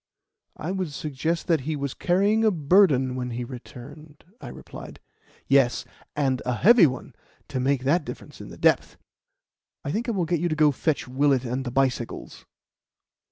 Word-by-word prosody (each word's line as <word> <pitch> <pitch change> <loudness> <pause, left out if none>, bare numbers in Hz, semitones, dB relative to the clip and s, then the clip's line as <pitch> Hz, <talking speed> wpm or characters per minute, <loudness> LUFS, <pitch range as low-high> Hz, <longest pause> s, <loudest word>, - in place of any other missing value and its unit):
"It 160 - -3
would 185 -5 -3
suggest 155 +3 -3
that 165 -3 +2
he 155 +4 -3
was 140 -2 -3
carrying 200 +5 +2
a 220 - +5
burden 150 -6 +3
when 125 -1 -3
he 120 +1 -4
returned," 140 +4 -11 0.2
I - - -8
replied. - - -10 0.5
"Yes; 135 -3 +3 0.3
and 135 -3 0
a 125 -1 -1
heavy 210 - +6
one, 130 0 -6 0.4
to 130 - -3
make 130 0 0
that 150 +5 +2
difference - - -10
in - - -9
the - - -11
depth. - - +2 0.9
I 140 - -2
think 230 +7 -2
I - - 0
will 185 -4 0
get 170 0 0
you 175 +2 0
to 155 - -1
go 155 -1 +4
and 140 - -3
fetch 155 -2 -1
Willett 135 0 +1
and 125 +2 -3
the 125 - -4
bicycles." 130 -2 -2
145 Hz, 180 wpm, -25 LUFS, 130-170 Hz, 0.9 s, heavy